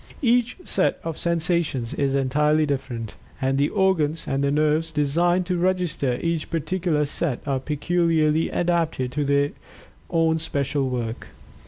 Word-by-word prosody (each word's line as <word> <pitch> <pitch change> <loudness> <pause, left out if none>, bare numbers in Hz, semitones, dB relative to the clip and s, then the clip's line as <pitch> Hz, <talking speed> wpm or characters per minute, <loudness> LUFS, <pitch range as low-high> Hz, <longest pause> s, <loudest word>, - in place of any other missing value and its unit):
Each 245 0 +2
set - - +1
of 165 -2 -4
sensations 170 -7 0
is 140 -1 0
entirely 150 +3 +2
different, 125 -6 -4 0.2
and 135 +1 0
the 145 - +2
organs 170 -6 +1
and 135 0 0
nerves 155 +3 +1
designed 170 +5 +2
to 180 0 -1
register 175 -8 0
each 165 -2 -1
particular 165 -2 0
set 145 -2 -1
are 135 -2 0
peculiarly 160 +2 +1
adapted 165 -7 0
to 150 +2 -1
their 140 0 +2 0.6
own 165 -1 +2
special 140 -3 -1
work. 120 -2 -4
155 Hz, 135 wpm, -24 LUFS, 140-170 Hz, 0.6 s, Each